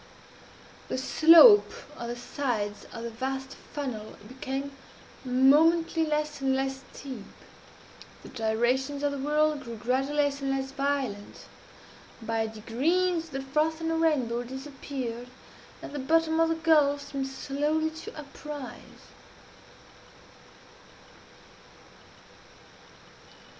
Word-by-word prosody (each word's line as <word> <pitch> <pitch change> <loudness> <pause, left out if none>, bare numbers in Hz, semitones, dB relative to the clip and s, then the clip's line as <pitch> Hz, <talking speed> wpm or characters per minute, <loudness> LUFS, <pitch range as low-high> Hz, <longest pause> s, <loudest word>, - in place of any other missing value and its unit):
The - - -3
slope 335 - +7 0.2
of 235 - -6
the 240 - -4
sides 240 -5 -3
of 230 - -7
the 235 - -5
vast 265 +3 -4 0.2
funnel 250 -7 -5
became 265 +3 -5 0.5
momently 315 +6 +4
less 300 -1 -2
and 265 -1 +2
less 270 0 -2
steep. 260 -7 -8 1.0
The - - -11
gyrations 250 +5 0
of 290 - +1
the 280 - -4
whirl 300 +2 +2
grew, 240 -5 -8
gradually, 260 +5 -1
less 285 -1 -2
and 275 - -2
less 270 0 -2
violent. 275 -7 -3 0.7
By 225 -1 -1
degrees, 325 +11 0
the 270 -2 -5
froth 305 +4 0
and 325 0 -2
the - - 0
rainbow 275 -8 +1
disappeared, 260 -2 -6 0.6
and - - -8
the 290 - -4
bottom 320 +3 +2
of 330 0 +4
the 330 - +1
gulf 290 -3 +2
seemed 275 -1 -2
slowly 295 +4 -1
to 320 0 -10
uprise. 290 -2 -10
275 Hz, 110 wpm, -28 LUFS, 250-305 Hz, 1.0 s, slope